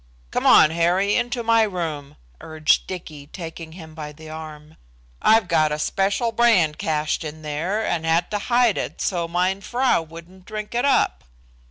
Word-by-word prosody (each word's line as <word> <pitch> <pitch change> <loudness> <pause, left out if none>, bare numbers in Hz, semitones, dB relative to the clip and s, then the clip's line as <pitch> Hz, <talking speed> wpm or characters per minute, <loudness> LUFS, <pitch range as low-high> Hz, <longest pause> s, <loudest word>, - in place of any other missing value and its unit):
"Come - - 0
on, 155 - +7
Harry, 175 +5 +1
into 245 0 -1
my 230 0 +4
room," 165 -9 -3 0.3
urged 155 -1 +1
Dicky, 155 -6 -8
taking 165 -1 -8
him 160 -3 -11
by 150 -2 -7
the 155 +1 -12
arm. 155 -1 -10 0.4
"I've 220 -3 +4
got 155 -3 +2
a 150 - -1
special 195 +8 0
brand 210 -11 +3
cached 155 0 -1
in 155 0 -8
there, 170 +9 -2
and 170 -2 -1
had 165 +2 +1
to 210 - -1
hide 240 0 +2
it - - -5
so 175 -3 -1
mein 180 +3 0
frau 250 -2 +1
wouldn't 170 +3 -13
drink 215 +1 -6
it 240 +3 0
up." 275 - +1
170 Hz, 170 wpm, -22 LUFS, 155-210 Hz, 0.4 s, on